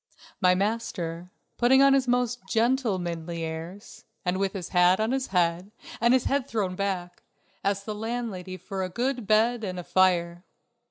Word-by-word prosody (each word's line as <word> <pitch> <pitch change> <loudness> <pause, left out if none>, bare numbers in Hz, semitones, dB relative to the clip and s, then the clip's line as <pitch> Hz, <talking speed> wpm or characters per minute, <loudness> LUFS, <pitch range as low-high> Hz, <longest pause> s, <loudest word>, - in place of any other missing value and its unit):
My 180 -1 +5
master, 180 -5 -2 0.3
putting 265 +3 +5
on 275 0 +6
his 270 -2 +2
most 245 0 +1
"gentlemanly" 185 -9 0
airs, 165 +6 -7 0.2
and 180 +1 0
with 195 -1 0
his 185 -4 -5
hat 180 +1 +4
on 220 +2 0
his 265 0 -1
head 180 +1 0 0.3
and 235 +2 +5
his 260 - +2
head 275 -1 0
thrown 200 -7 -2
back, 185 -2 -3 0.4
asked 200 0 -1
the 215 - -3
landlady 210 -4 -4
for 190 +2 -5
a 185 - -2
good 245 +2 -2
bed 225 +2 +3
and 185 -3 -4
a 180 - -5
fire. 175 -1 +2
195 Hz, 165 wpm, -26 LUFS, 180-235 Hz, 0.4 s, on